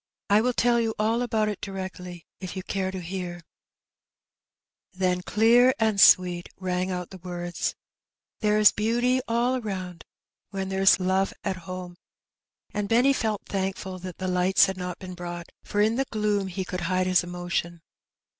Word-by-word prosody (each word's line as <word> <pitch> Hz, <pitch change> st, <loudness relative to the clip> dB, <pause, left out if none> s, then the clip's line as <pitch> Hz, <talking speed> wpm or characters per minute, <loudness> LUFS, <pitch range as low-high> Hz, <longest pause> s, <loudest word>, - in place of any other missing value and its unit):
I 210 Hz, +1 st, +6 dB
will 250 Hz, +2 st, +1 dB
tell 240 Hz, 0 st, +3 dB
you 225 Hz, -1 st, -1 dB
all 225 Hz, +3 st, +1 dB
about 220 Hz, -3 st, 0 dB
it 210 Hz, -2 st, -4 dB
directly, 185 Hz, -3 st, -7 dB
if 185 Hz, -1 st, -6 dB
you 185 Hz, -, -4 dB
care 190 Hz, -1 st, -2 dB
to 190 Hz, -1 st, -5 dB
hear/' 175 Hz, -1 st, -5 dB, 1.5 s
Then, 180 Hz, -1 st, 0 dB
clear 235 Hz, +6 st, +4 dB
and 220 Hz, -3 st, +2 dB
sweet, 180 Hz, -3 st, +5 dB
rang 185 Hz, 0 st, -2 dB
out 180 Hz, -1 st, -4 dB
the 190 Hz, -, -10 dB
words 175 Hz, -1 st, -4 dB, 0.3 s
— -, -, -67 dB
There 210 Hz, -1 st, +3 dB
is 215 Hz, -1 st, +7 dB
beauty 240 Hz, +4 st, +1 dB
all 245 Hz, +2 st, +1 dB
aronnd 185 Hz, -5 st, -5 dB, 0.5 s
When 195 Hz, -1 st, -4 dB
there's 195 Hz, 0 st, +4 dB
love 190 Hz, +1 st, +1 dB
at 195 Hz, -2 st, -1 dB
home.*' 180 Hz, -1 st, -6 dB, 0.8 s
And 205 Hz, -1 st, -2 dB
Benny 250 Hz, +4 st, +4 dB
felt 220 Hz, -5 st, -1 dB
thankful 190 Hz, -1 st, -3 dB
that 180 Hz, -1 st, -8 dB
the 185 Hz, -, -3 dB
lights 180 Hz, +1 st, +4 dB
had 190 Hz, -, -3 dB
not 180 Hz, -1 st, -5 dB
been 185 Hz, -1 st, -8 dB
brought, 175 Hz, -1 st, -7 dB
for 205 Hz, -, -1 dB
in 220 Hz, +3 st, +2 dB
the 270 Hz, -, +1 dB
gloom 210 Hz, -4 st, -1 dB
he 190 Hz, 0 st, -4 dB
could 180 Hz, +2 st, -4 dB
hide 185 Hz, +2 st, 0 dB
his 185 Hz, 0 st, +3 dB
emotion. 175 Hz, -1 st, -4 dB
190 Hz, 170 wpm, -26 LUFS, 180-215 Hz, 1.5 s, is